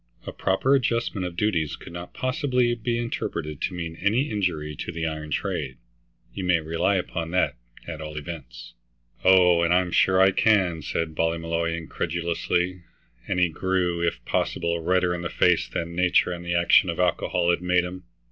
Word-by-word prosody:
A - - -5
proper 95 +8 +1
adjustment 115 -7 0
of 85 - -8
duties 85 -7 0
could - - -12
not 85 0 -7
possibly 130 -2 0
be 115 0 -2
interpreted 85 -10 -4
to 90 - -2
mean 85 -2 -5
any 115 - +1
injury 85 -8 -2
to - - -5
the 80 -1 -3
iron 75 -1 -4
trade. 65 -2 -3 0.6
You 95 - -5
may 90 -2 +3
rely 80 +5 0
upon 85 -2 -3
that, 90 - +2 0.3
at 80 -2 -6
all 75 0 -7
events." 75 -3 -8 0.5
"Oh, 90 -2 +6
and 85 0 +2
I'm 90 0 +2
sure 95 +1 +3
I 95 0 +6
can," 95 -6 +2
said 80 +2 -3
Ballymolloy 85 +1 -1
incredulously, 85 +2 -2 0.5
and 90 - 0
he 90 -1 +3
grew, 90 0 -1
if 85 0 -2
possible, 85 0 -1
redder 90 +1 +2
in 90 - -4
the 85 - -3
face 90 -1 +2
than 85 0 -4
nature 90 0 +3
and 85 -1 -5
the 85 0 -2
action 85 +1 +5
of 85 - -3
alcohol 90 -1 +1
had 85 - 0
made 90 0 +2
him. 90 +1 -7
90 Hz, 175 wpm, -25 LUFS, 85-95 Hz, 0.6 s, Oh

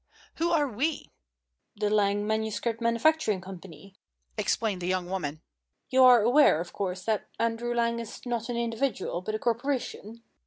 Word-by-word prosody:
Who 335 +1 +1
are 310 -4 +2
we?" 275 +6 -2 0.6
"The 210 0 -1
Lang 205 -1 +2
Manuscript 220 +2 -2
Manufacturing 230 -1 +2
Company," 185 -1 -11 0.4
explained 205 -5 -1
the 175 - -3
young 185 -1 -1
woman. 155 -5 -4 0.5
"You 260 0 +5
are 245 -3 +7
aware, 245 - +5
of 175 +1 -6
course, 185 -2 -3
that 220 -2 -1
Andrew 230 +1 -1
Lang 235 0 +1
is 230 +2 -8
not 240 -1 -3
an 240 - -2
individual, 230 -6 -2
but 215 +4 -3
a - - 0
corporation?" 235 -2 -3
225 Hz, 155 wpm, -28 LUFS, 195-240 Hz, 0.6 s, are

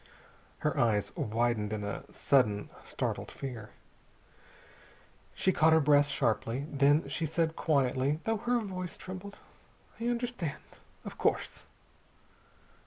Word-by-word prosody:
Her - - +1
eyes 105 -3 +1
widened 110 -1 0
in 105 -1 -3
a 100 -1 -5
sudden 105 -7 +2
startled - - -3
fear. 120 -6 -7 1.7
She 190 - +2
caught 160 -2 +4
her 160 - +6
breath 145 -1 +5
sharply. 120 0 0
Then 145 +2 +3
she 165 - -2
said 160 +1 0
quietly, 140 -1 +1
though 225 0 0
her 240 +3 +1
voice 185 -4 -5
trembled: 190 +2 -8 0.6
"I 230 - -2
understand. 240 - -3 0.3
Of - - -8
course." - - -1
145 Hz, 115 wpm, -31 LUFS, 120-185 Hz, 1.7 s, her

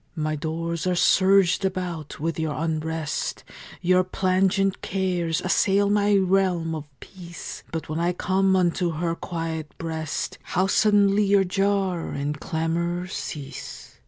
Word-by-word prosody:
My 155 -1 -1
doors 165 +3 -3
are 180 - +2
surged 190 +1 +4
about 180 -6 -3
with 165 +2 -2
your 155 -2 -1
unrest; 160 -1 -2 0.4
Your 185 +1 +4
plangent 190 +1 +1
cares 180 -4 -1
assail 200 +2 +2
my 205 0 +3
realm 185 -4 +2
of 155 -2 -5
peace; 175 -3 -9
But 165 -1 -4
when 155 +1 -3
I 170 +1 +2
come 190 +1 +2
unto 175 -1 +1
her 165 +2 -1
quiet 165 -3 -5
breast 160 -2 -4
How 185 +1 0
suddenly 205 0 +4
your 200 0 +4
jar 195 -2 0
and 145 +1 -3
clamor 170 +3 -1
cease! 145 -6 -7
175 Hz, 130 wpm, -24 LUFS, 160-190 Hz, 0.4 s, surged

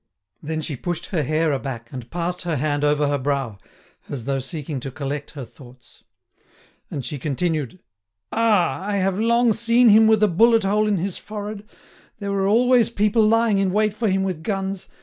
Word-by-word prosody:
Then 160 +1 -3
she 155 -2 -4
pushed 175 +5 -4
her 175 -5 0
hair 155 +2 +1
aback, 130 -4 -5
and 125 -3 -8
passed 175 +1 -3
her 170 -3 -2
hand 145 +1 -1
over 150 0 +2
her 145 0 0
brow, 135 -6 -2 0.5
as 125 -5 -5
though 135 -1 -1
seeking 140 +1 -5
to 135 - -6
collect 145 +1 -5
her 135 - -5
thoughts. 125 0 -17 0.9
And 135 - -5
she 145 -3 -5
continued: 155 +1 -2 0.5
"Ah! 215 -8 +2
I 205 +1 -2
have 195 0 0
long 235 +1 +3
seen 235 +2 +4
him 220 +1 +7
with 220 -1 +4
a - - +6
bullet 225 +5 +4
hole 210 +2 +2
in 205 -2 +1
his 185 +1 -3
forehead. 210 0 -7 0.5
There 200 -1 -4
were 195 -1 0
always 240 +3 +4
people 210 0 +2
lying 220 -1 +3
in 195 -1 +1
wait 210 +1 +1
for 215 0 -1
him 190 0 +1
with 185 -5 -3
guns. 195 0 -3
180 Hz, 190 wpm, -22 LUFS, 145-210 Hz, 0.9 s, him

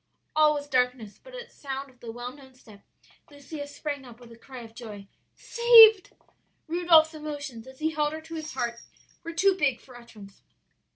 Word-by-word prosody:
"All 305 -1 +4
was 290 0 -5
darkness, 250 -5 -1
but - - -13
at 485 -1 -10
sound 275 -1 -7
of 250 - -29
the 230 - -8
well 240 +2 -7
known 265 -2 -17
step 215 -5 -17 0.5
Lucia 285 0 -9
sprang 285 -1 -6
up 240 -2 -14
with 240 -1 -15
a - - -12
cry 255 +2 -12
of 225 -1 -14
joy. 210 -4 -10 0.3
'Saved!' 455 -4 +6 0.5
"Rudolph's 330 -1 +4
emotions, 285 -6 -7
as 260 0 -13
he 315 +2 -1
held 300 -1 -1
her 315 - -7
to 325 +1 -12
his 315 -1 -6
heart, 235 -2 -3 0.4
were 335 - -6
too 385 +3 +3
big 285 -9 0
for 255 - -17
utterance. 215 -5 -15
285 Hz, 185 wpm, -26 LUFS, 245-315 Hz, 0.5 s, Saved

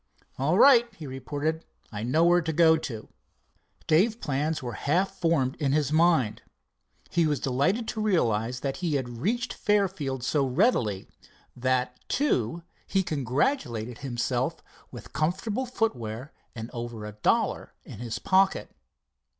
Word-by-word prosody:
"All 155 +7 +2
right," 240 -2 +6
he 160 - -9
reported, 145 +4 -3 0.3
"I 105 -1 -5
know 130 +8 +2
where 175 +1 +5
to 160 -1 -2
go 160 0 +5
to." 115 -8 -6 0.8
Dave's 195 +9 +3
plans 150 - -2
were 120 -2 -4
half 175 - 0
formed 155 -6 +1
in 140 -3 0
his 150 -1 +1
mind. 160 -9 +3 0.7
He 170 -2 +3
was 150 -2 0
delighted 180 - 0
to 220 - -3
realize 125 - +1
that 135 -1 -2
he 170 -5 -1
had 120 -4 -3
reached 240 - -1
Fairfield 185 - 0
so 140 +2 +1
readily—that, 125 - -1
too, 170 - 0 0.2
he 195 -1 +1
congratulated 125 - -1
himself, 125 -4 -2 0.3
with - - -11
comfortable 205 +10 -1
footwear 130 - -3 0.2
and 115 0 -7
over 120 -3 -6
a 105 - -6
dollar 105 0 0
in - - -11
his 120 -2 -4
pocket. 190 0 +2
145 Hz, 135 wpm, -27 LUFS, 125-180 Hz, 0.8 s, right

